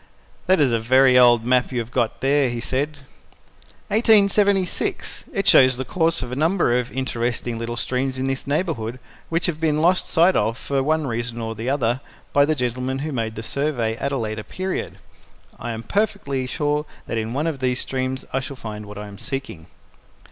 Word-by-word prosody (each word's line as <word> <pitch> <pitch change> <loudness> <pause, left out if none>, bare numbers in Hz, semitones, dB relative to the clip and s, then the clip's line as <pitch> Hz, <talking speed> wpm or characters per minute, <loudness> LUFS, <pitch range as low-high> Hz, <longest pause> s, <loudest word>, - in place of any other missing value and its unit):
"That 185 -1 +4
is 140 -4 +4
a 115 - +2
very 130 +3 +5
old 120 -2 +6
map 125 +1 +2
you 125 - -3
have 115 0 -3
got 120 -3 -1
there," 140 0 +3
he 120 0 -3
said. 140 +5 -2 0.9
"1876. 200 -3 +2
It 195 -3 -2
shows 130 -1 +6
the 130 - -3
course 165 +2 +1
of 125 - -7
a - - -3
number 160 -3 +2
of 125 -1 -1
interesting 120 -2 -2
little 115 0 -4
streams 130 +2 -1
in 130 - -2
this 135 +1 -3
neighbourhood 140 -7 -1 0.3
which 165 +1 0
have 160 -3 -1
been 155 -2 +1
lost 180 +3 +3
sight 175 +2 +4
of 110 +3 +1
for 140 +1 -1
one 155 +2 +1
reason 120 -1 -3
or 115 -1 -3
the 115 +3 -4
other 130 -2 0 0.3
by 140 0 +5
the 155 +1 +1
gentleman 125 0 -2
who 155 - -3
made 115 -4 -2
the 110 - -6
survey 125 -4 -1
at 140 - -2
a 140 - 0
later 110 -2 -3
period. 185 - -4 0.6
I 120 - -5
am 115 0 -5
perfectly 140 - -1
sure 150 +2 -1 0.2
that 115 - -2
in 110 +1 -3
one 145 +4 -1
of 160 -4 -2
these 125 -1 0
streams 130 0 -2
I 135 - +2
shall 135 +1 -6
find 105 -4 -7
what 105 0 -9
I 105 - -6
am 100 0 -11
seeking." 125 - -6
130 Hz, 200 wpm, -22 LUFS, 120-150 Hz, 0.9 s, old